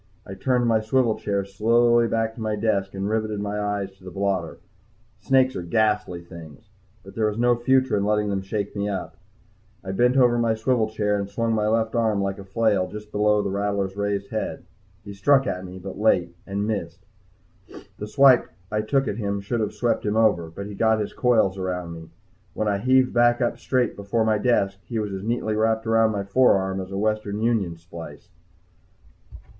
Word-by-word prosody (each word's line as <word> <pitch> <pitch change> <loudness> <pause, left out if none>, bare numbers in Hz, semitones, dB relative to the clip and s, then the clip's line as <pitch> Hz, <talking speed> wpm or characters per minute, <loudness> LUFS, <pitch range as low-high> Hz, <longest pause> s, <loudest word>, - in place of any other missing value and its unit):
I 95 - -8
turned 125 +5 0
my 115 -2 +3
swivel 115 +1 +2
chair 100 -1 -1
slowly 115 +4 +3
back 115 0 -1
to 115 - -10
my 110 -1 -1
desk 100 -2 -1
and 95 +1 -2
riveted 110 -1 -1
my 105 0 -3
eyes 100 -1 -2
to 95 - -22
the 90 - -8
blotter. 95 -3 -2 0.6
Snakes 130 +3 +2
are - - -3
ghastly 105 -1 0
things. 85 +3 -13 0.3
But 95 - -12
there 110 -1 +1
was 105 0 -3
no 120 +1 +3
future 130 0 +2
in 100 - +1
letting 105 0 +1
them 100 -1 -1
shake 100 +1 -4
me 100 0 -1
up. 95 -3 -4 0.7
I 95 - -4
bent 125 +6 +2
over 120 -2 +4
in - - +1
my 115 -1 +1
swivel 110 0 +1
chair 105 -1 0
and 100 0 -4
swung 115 +2 -1
my 105 -1 +1
left 110 0 +1
arm 110 -3 +1
like 100 0 -2
a - - -8
flail 100 -1 +1
just 105 0 -9
below 105 0 +2
this 100 -1 -3
rattler's 100 -1 -1
raised 100 -1 -2
head. 110 - -3 0.4
He 100 - -8
struck 135 +7 +3
at 90 -6 -3
me, 90 0 -9
but 95 +1 -8
late, 90 -5 +2
and 100 +1 -2
missed. 95 -3 -4 0.9
The 105 - -5
swipe 130 +3 +5 0.2
I 105 0 0
took 135 +5 0
at 105 - -3
him 100 -3 -2
should 100 +4 -3
have 110 - -1
swept 120 - 0
him 105 0 -1
over, 105 -7 +2
but 100 +5 -7
he 105 - -7
got 110 +2 +2
his 105 - -3
coils 110 -6 +2
around 90 -2 -3
me. 80 -1 -10 0.5
When 110 - -1
I 100 -1 +1
heaved 130 +3 +3
back 120 0 +4
up 120 -1 -1
straight 125 0 0
before 100 +3 -1
my 110 -1 +2
desk, 100 -6 +1
he 115 - -5
was 105 -2 -2
as 95 - -5
neatly 110 0 -1
wrapped 110 +1 +1
around 115 0 +3
my 100 -2 -2
forearm 95 -3 +2
as 95 - -8
a 95 - -4
Western 105 0 -1
Union 110 -7 0
splice. 85 -2 -11
105 Hz, 205 wpm, -24 LUFS, 100-115 Hz, 0.9 s, swipe